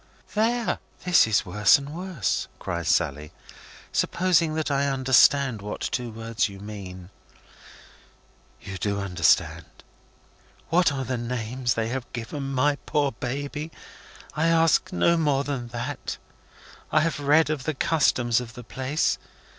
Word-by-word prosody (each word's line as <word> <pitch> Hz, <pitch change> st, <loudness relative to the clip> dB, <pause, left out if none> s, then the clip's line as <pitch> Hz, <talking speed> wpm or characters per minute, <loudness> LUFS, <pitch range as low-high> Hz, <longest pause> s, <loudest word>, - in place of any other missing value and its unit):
"There! 230 Hz, +2 st, +1 dB, 0.3 s
This 180 Hz, -9 st, +5 dB
is 110 Hz, 0 st, +2 dB
worse 105 Hz, +2 st, +5 dB
and 140 Hz, +1 st, -8 dB
worse," 175 Hz, -, -2 dB
cries 85 Hz, -1 st, -4 dB
Sally, 75 Hz, -3 st, 0 dB, 0.6 s
"supposing 170 Hz, -3 st, +2 dB
that 155 Hz, -2 st, -1 dB
I 140 Hz, 0 st, +1 dB
understand 130 Hz, -2 st, +4 dB
what 105 Hz, +1 st, -5 dB
two 125 Hz, -1 st, -2 dB
words 115 Hz, 0 st, -2 dB
you 100 Hz, -1 st, -11 dB
mean." 95 Hz, -3 st, -9 dB, 1.5 s
"You 95 Hz, -2 st, -8 dB
do 100 Hz, +1 st, -1 dB
understand. 100 Hz, -3 st, +1 dB, 1.0 s
What 170 Hz, 0 st, +4 dB
are 135 Hz, -2 st, -3 dB
the 125 Hz, 0 st, -2 dB
names 120 Hz, +1 st, -2 dB
they 115 Hz, 0 st, -1 dB
have 130 Hz, 0 st, -5 dB
given 135 Hz, +4 st, -5 dB
my 140 Hz, +2 st, +2 dB
poor 145 Hz, -2 st, +1 dB
baby? 145 Hz, +6 st, -5 dB, 0.6 s
I 155 Hz, +2 st, +1 dB
ask 165 Hz, -2 st, +3 dB
no 170 Hz, -, +3 dB
more 145 Hz, -4 st, +1 dB
than 135 Hz, -4 st, -4 dB
that. 120 Hz, +4 st, -5 dB, 0.7 s
I 155 Hz, -, +4 dB
have 165 Hz, -1 st, -1 dB
read 150 Hz, +2 st, +3 dB
of 145 Hz, -4 st, -3 dB
the 155 Hz, -, -1 dB
customs 125 Hz, -6 st, +2 dB
of 115 Hz, -2 st, -9 dB
the 125 Hz, -, -9 dB
place. 130 Hz, +6 st, -1 dB
130 Hz, 140 wpm, -25 LUFS, 110-150 Hz, 1.5 s, This